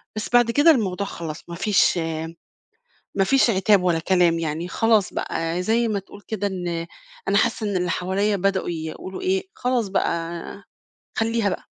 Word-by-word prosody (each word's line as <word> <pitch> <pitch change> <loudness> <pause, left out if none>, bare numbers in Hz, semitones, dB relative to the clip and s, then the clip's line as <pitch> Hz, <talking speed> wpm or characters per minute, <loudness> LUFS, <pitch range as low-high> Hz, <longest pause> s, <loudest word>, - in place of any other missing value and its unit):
بس 215 - -4
بعد 240 -1 +5
كده 290 +7 +6
الموضوع 200 - 0
خلاص 165 0 -7
ما 170 - -5
فيش 190 -1 +3 1.2
ما 195 - +3
فيش 265 +4 +4
عتاب 195 -1 +3
ولا 175 -2 +2
كلام 175 -1 +3
يعني، 165 +1 -3
خلاص 220 -1 +2
بقى 165 +2 -2
زي 230 +4 +2
ما 210 -2 0
تقول 195 +1 -12
كده 205 -2 -2
إن 175 -3 -3 0.4
أنا 200 - +3
حاسّة 220 0 +1
إن 200 - -1
اللي 180 -1 0
حواليّا 195 +4 0
بدأوا 195 0 0
يقولوا 165 +3 -6
إيه: 190 +1 +1
"خلاص 245 -4 0
بقى 170 0 -2 0.6
خلّيها 225 -1 +1
بقى، - - -4
190 Hz, 165 wpm, -23 LUFS, 175-215 Hz, 1.2 s, كده